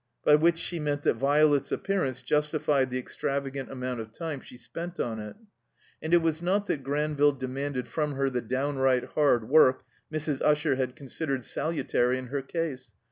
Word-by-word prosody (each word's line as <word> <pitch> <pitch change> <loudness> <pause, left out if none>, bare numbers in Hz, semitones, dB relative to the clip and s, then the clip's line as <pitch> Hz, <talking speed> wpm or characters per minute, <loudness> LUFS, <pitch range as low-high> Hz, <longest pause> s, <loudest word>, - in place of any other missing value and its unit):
By 150 - +6
which 165 +3 +5
she 170 0 -2
meant 145 -1 -1
that - - +3
Violet's 145 +3 +3
appearance 140 -11 -1
justified 150 -3 +1
the 125 - -2
extravagant 135 +1 -3
amovint 125 -2 -4
of 110 -1 -7
time 155 +1 -5
she 125 - -13
spent 170 +8 -7
on 110 -2 -2
it. 105 0 -7 0.7
And 160 - -4
it 175 -1 +5
was 160 0 0
not 195 +4 +1
that 150 - -2
Granville 145 +1 +2
demanded 130 0 -4
from 150 -2 -1
her 135 0 0
the 125 -1 -1
downright 130 +1 +1
hard 125 -7 +2
work 130 -2 +5 0.3
Mrs. 155 -3 -2
Usher 150 -1 +3
had 130 -1 -2
considered 135 -1 -3
salutary 130 -5 0
in 130 -1 -7
her 140 +1 -2
case. 135 -6 -4
140 Hz, 175 wpm, -28 LUFS, 130-155 Hz, 0.7 s, By